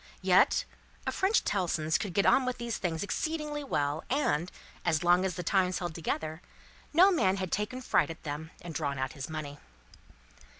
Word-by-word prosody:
Yet, -, -, +4 dB, 0.4 s
a -, -, 0 dB
French 390 Hz, +4 st, +2 dB
Tellson's 160 Hz, -5 st, 0 dB
could 195 Hz, -5 st, -4 dB
get 200 Hz, -, +3 dB
on 265 Hz, -, +5 dB
with 255 Hz, -1 st, -2 dB
these 235 Hz, -1 st, -3 dB
things 165 Hz, -2 st, -2 dB
exceedingly 300 Hz, +5 st, -2 dB
well, 145 Hz, -, -1 dB
and, 180 Hz, -, +1 dB, 0.3 s
as 160 Hz, +1 st, +1 dB
long 175 Hz, +1 st, +5 dB
as 185 Hz, -3 st, -1 dB
the 180 Hz, -, -4 dB
times 185 Hz, 0 st, +2 dB
held 175 Hz, -2 st, -4 dB
together, 160 Hz, 0 st, -3 dB, 0.5 s
no 365 Hz, +5 st, +6 dB
man 200 Hz, -, +2 dB
had 185 Hz, -3 st, -3 dB
taken 210 Hz, +5 st, -2 dB
fright -, -, +2 dB
at 165 Hz, -, -8 dB
them, 150 Hz, +1 st, -5 dB
and 170 Hz, -1 st, -6 dB
drawn 140 Hz, -1 st, -2 dB
out 130 Hz, 0 st, -2 dB
his 140 Hz, 0 st, -6 dB
money. 150 Hz, -2 st, -6 dB
180 Hz, 180 wpm, -30 LUFS, 155-235 Hz, 0.5 s, no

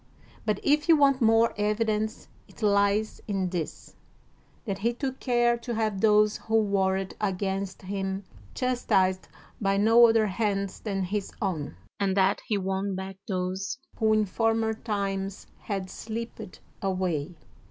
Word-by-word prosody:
But 210 Hz, -2 st, +1 dB
if 295 Hz, +2 st, +2 dB
you 325 Hz, -, +8 dB
want 275 Hz, -2 st, +4 dB
more 225 Hz, 0 st, +4 dB
evidence, 215 Hz, +1 st, 0 dB, 0.2 s
it -, -, -12 dB
lies 205 Hz, +1 st, +2 dB
in 195 Hz, -3 st, -1 dB
this, 170 Hz, -4 st, -5 dB, 0.7 s
that 195 Hz, -4 st, -3 dB
he 235 Hz, +4 st, +1 dB
took 265 Hz, +1 st, -3 dB
care 240 Hz, -2 st, +2 dB
to 235 Hz, 0 st, -5 dB
have 215 Hz, -3 st, -1 dB
those 210 Hz, -1 st, +4 dB
who 220 Hz, -, -2 dB
warred 195 Hz, -3 st, +1 dB
against 195 Hz, -1 st, -2 dB
him 195 Hz, 0 st, -3 dB, 0.3 s
chastised 190 Hz, -7 st, +1 dB, 0.3 s
by 195 Hz, -1 st, +2 dB
no 225 Hz, +3 st, +7 dB
other 225 Hz, -1 st, +3 dB
hands 200 Hz, -1 st, -1 dB
than 195 Hz, -3 st, -2 dB
his 200 Hz, +2 st, -3 dB
own, 165 Hz, -, -2 dB, 0.2 s
and 195 Hz, -1 st, +1 dB
that 195 Hz, +1 st, +3 dB
he 210 Hz, -, +1 dB
won 195 Hz, 0 st, -2 dB
back 190 Hz, 0 st, -6 dB
those 190 Hz, +2 st, -2 dB, 0.2 s
who 220 Hz, -1 st, +2 dB
in 215 Hz, 0 st, +3 dB
former 225 Hz, +2 st, +1 dB
times 200 Hz, -3 st, -3 dB
had 195 Hz, -3 st, -4 dB
slipped 220 Hz, -3 st, -7 dB, 0.2 s
away. 185 Hz, -4 st, -1 dB
205 Hz, 140 wpm, -27 LUFS, 190-225 Hz, 0.7 s, you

